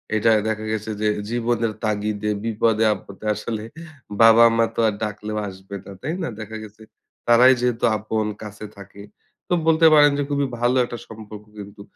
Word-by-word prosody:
এটা 110 Hz, +1 st, +2 dB, 0.2 s
দেখা 110 Hz, 0 st, -3 dB
গেছে 110 Hz, 0 st, -3 dB
যে, 110 Hz, -, +1 dB, 0.2 s
জীবনের 115 Hz, -1 st, -1 dB
তাগিদে, 105 Hz, 0 st, -1 dB
বিপদে-আপদে, 110 Hz, -2 st, 0 dB
আসলে 105 Hz, 0 st, -5 dB, 0.6 s
বাবা-মা 115 Hz, 0 st, +6 dB
তো -, -, -4 dB
আর 110 Hz, -, 0 dB
ডাকলেও 105 Hz, 0 st, -4 dB
আসবে 95 Hz, +1 st, -10 dB
না, -, -, -10 dB
তাই 155 Hz, +5 st, -3 dB
না? -, -, -2 dB
দেখা 110 Hz, 0 st, -7 dB
গেছে 110 Hz, +1 st, -14 dB, 0.5 s
তারাই 125 Hz, +2 st, +7 dB
যেহেতু 120 Hz, -1 st, 0 dB
আপন 110 Hz, +1 st, -2 dB, 0.2 s
কাছে 105 Hz, 0 st, -9 dB
থাকে। 100 Hz, 0 st, -13 dB, 0.5 s
তো -, -, -1 dB
বলতে 165 Hz, 0 st, +4 dB
পারেন 145 Hz, -1 st, +6 dB
যে 145 Hz, -, 0 dB
খুবই 140 Hz, -1 st, 0 dB
ভালো 120 Hz, +2 st, +2 dB
একটা 120 Hz, -, -7 dB
সম্পর্ক 105 Hz, -1 st, -11 dB, 0.2 s
কিন্তু 100 Hz, 0 st, -14 dB
110 Hz, 160 wpm, -22 LUFS, 105-120 Hz, 0.6 s, তারাই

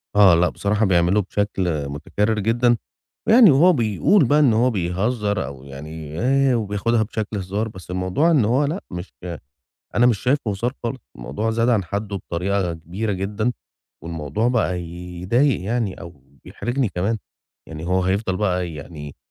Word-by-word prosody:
آه، 100 Hz, -4 st, +7 dB
لأ، 85 Hz, +1 st, +3 dB
بصراحة 105 Hz, +2 st, 0 dB
بيعمله 90 Hz, +2 st, +3 dB
بشكل 90 Hz, -7 st, -1 dB
مُتكرر 105 Hz, +9 st, -1 dB
جدًا، 120 Hz, +3 st, +2 dB, 0.5 s
يعني 225 Hz, -5 st, +8 dB
وهو 170 Hz, +7 st, +6 dB
بيقول 125 Hz, -, +3 dB
بقى 145 Hz, +5 st, +3 dB
إن 135 Hz, -7 st, +5 dB
هو 120 Hz, +3 st, +3 dB
بيهزر 105 Hz, -, -1 dB
أو 65 Hz, -1 st, -9 dB
يعني 75 Hz, +3 st, -8 dB
آآ 135 Hz, +1 st, +3 dB
وبياخدها 110 Hz, +1 st, 0 dB
بشكل 110 Hz, -1 st, -4 dB
هزار، 100 Hz, +4 st, -2 dB
بس 95 Hz, -4 st, -10 dB
الموضوع 95 Hz, -, +1 dB
إن 135 Hz, -9 st, +4 dB
هو 130 Hz, +6 st, +2 dB
لأ، 165 Hz, +7 st, -3 dB
مش 90 Hz, +1 st, -7 dB
ك 85 Hz, -3 st, -6 dB, 0.5 s
أنا 120 Hz, +1 st, +5 dB
مش 115 Hz, -5 st, +3 dB
شايفه 125 Hz, -3 st, 0 dB
هزار 115 Hz, +5 st, -1 dB
خالص، 125 Hz, +2 st, -3 dB, 0.2 s
الموضوع 105 Hz, -, -3 dB
زاد 115 Hz, +2 st, +1 dB
عن 105 Hz, -6 st, +2 dB
حَدّه 100 Hz, +3 st, -3 dB
بطريقة 90 Hz, 0 st, -2 dB
كبيرة 95 Hz, +7 st, -4 dB
جدًا، 105 Hz, +5 st, -1 dB, 0.5 s
والموضوع 85 Hz, -, -1 dB
بقى 110 Hz, -7 st, 0 dB
ي 85 Hz, +1 st, -8 dB
يضايق 125 Hz, +9 st, +2 dB
يعني 110 Hz, -1 st, -2 dB
أو 85 Hz, -5 st, -11 dB, 0.2 s
بيحرجني 125 Hz, 0 st, -2 dB
كمان. 100 Hz, +5 st, -1 dB, 0.5 s
يعني 80 Hz, +1 st, -7 dB
هو 95 Hz, 0 st, +1 dB
هيفضل 95 Hz, 0 st, 0 dB
بقى 90 Hz, -4 st, -1 dB
يعني 75 Hz, -1 st, -9 dB
100 Hz, 160 wpm, -22 LUFS, 90-115 Hz, 0.5 s, يعني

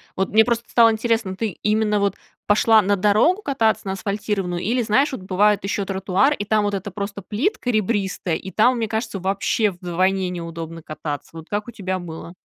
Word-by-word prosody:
вот 190 Hz, 0 st, -1 dB
мне 220 Hz, +1 st, +5 dB
просто 235 Hz, -1 st, 0 dB
стало 230 Hz, -1 st, +5 dB
интересно, 220 Hz, -3 st, -1 dB
ты 220 Hz, +2 st, -2 dB
именно, 210 Hz, 0 st, +2 dB
вот 200 Hz, 0 st, 0 dB, 0.3 s
пошла 215 Hz, +1 st, +5 dB
на 205 Hz, +1 st, +2 dB
дорогу 215 Hz, -, +3 dB
кататься 230 Hz, -, 0 dB
на 190 Hz, -, -2 dB
асфальтированную 195 Hz, -3 st, -2 dB
или, 240 Hz, +6 st, 0 dB
знаешь, 255 Hz, +7 st, +2 dB
вот 260 Hz, -, -6 dB
бывают 200 Hz, +2 st, +2 dB
ещё 200 Hz, 0 st, -1 dB
тротуар. 195 Hz, +7 st, +1 dB
И 205 Hz, -, -4 dB
там 215 Hz, 0 st, +2 dB
вот 205 Hz, 0 st, -1 dB
это 195 Hz, +1 st, -3 dB
просто 200 Hz, +1 st, -5 dB
плитка 250 Hz, -, -2 dB
ребристая, 200 Hz, -6 st, 0 dB
и 190 Hz, -, -8 dB
там, 245 Hz, +5 st, +3 dB
мне 225 Hz, -1 st, -1 dB
кажется, 220 Hz, -2 st, -3 dB
вообще 200 Hz, +3 st, 0 dB
вдвойне 185 Hz, +1 st, 0 dB
неудобно 165 Hz, -1 st, -6 dB
кататься. 150 Hz, -2 st, -6 dB
Вот 160 Hz, 0 st, -10 dB
как 210 Hz, +2 st, -2 dB
у -, -, -7 dB
тебя 190 Hz, -4 st, -3 dB
было? 170 Hz, 0 st, -8 dB
205 Hz, 195 wpm, -22 LUFS, 185-220 Hz, 0.3 s, мне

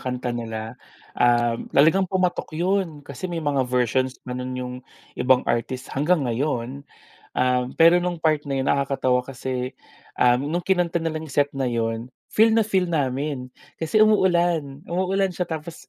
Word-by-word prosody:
kanta 125 Hz, -1 st, -3 dB
nila. 110 Hz, -1 st, -5 dB, 0.4 s
Um, 120 Hz, -1 st, +2 dB
talagang 165 Hz, +7 st, +4 dB
pumatok 185 Hz, -3 st, -1 dB
yun, 180 Hz, -3 st, 0 dB
kasi 140 Hz, +6 st, -6 dB
may 170 Hz, -1 st, -3 dB
mga 140 Hz, -2 st, +1 dB
versions 125 Hz, +1 st, +1 dB
pa 125 Hz, -, -5 dB
nun 125 Hz, 0 st, -4 dB
'yung 125 Hz, 0 st, -4 dB, 0.5 s
ibang 130 Hz, 0 st, +4 dB
artists, 125 Hz, +2 st, -2 dB
hanggang 150 Hz, +1 st, +1 dB
ngayon. 125 Hz, +1 st, -2 dB, 0.5 s
Um, 125 Hz, 0 st, +1 dB
pero 165 Hz, +2 st, +6 dB
nung 175 Hz, -2 st, -2 dB
part 155 Hz, -2 st, +1 dB
na 135 Hz, -1 st, -2 dB
'yun 135 Hz, -, -1 dB
nakakatawa 135 Hz, -2 st, +1 dB
kasi, 130 Hz, -1 st, -4 dB, 0.5 s
um, 125 Hz, +2 st, +4 dB
nung 175 Hz, -, 0 dB
kinanta 175 Hz, -3 st, +1 dB
nila 160 Hz, -1 st, -3 dB
'yung 150 Hz, -, -10 dB
set 145 Hz, 0 st, +2 dB
na 135 Hz, -, 0 dB
'yun 115 Hz, 0 st, -2 dB, 0.2 s
feel 220 Hz, +1 st, +4 dB
na 225 Hz, -, +4 dB
feel 195 Hz, -4 st, +1 dB
namin, 140 Hz, -4 st, -2 dB, 0.3 s
kasi 215 Hz, +7 st, +4 dB
umuulan, 175 Hz, -8 st, +2 dB
umuulan 190 Hz, +2 st, 0 dB
siya 180 Hz, -1 st, -3 dB
tapos 160 Hz, 0 st, -7 dB
140 Hz, 160 wpm, -23 LUFS, 125-170 Hz, 0.5 s, pero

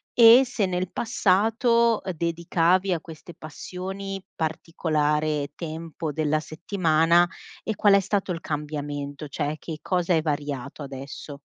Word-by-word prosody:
e 235 Hz, +2 st, +9 dB
se 220 Hz, -5 st, -1 dB
nel 180 Hz, 0 st, -2 dB
passato, 225 Hz, +2 st, +2 dB
ehm, 185 Hz, -2 st, -3 dB
dedicavi 170 Hz, +3 st, +1 dB
a 165 Hz, -, -1 dB
queste 165 Hz, +1 st, -11 dB
passioni 190 Hz, +4 st, -6 dB
particolare 155 Hz, -2 st, -1 dB
tempo 160 Hz, -1 st, -5 dB
della 155 Hz, 0 st, 0 dB
settimana 165 Hz, +1 st, +2 dB, 0.4 s
e 220 Hz, -, -2 dB
qual 205 Hz, -1 st, +5 dB
è -, -, +6 dB
stato 195 Hz, -1 st, -1 dB
il 165 Hz, -1 st, -4 dB
cambiamento, 145 Hz, -1 st, -4 dB
cioè 150 Hz, +2 st, -3 dB
che 155 Hz, -1 st, -7 dB
cosa 180 Hz, -1 st, 0 dB
è 160 Hz, -, +3 dB
variato 145 Hz, -2 st, -3 dB
adesso? 140 Hz, +1 st, -8 dB
165 Hz, 130 wpm, -25 LUFS, 150-190 Hz, 0.4 s, e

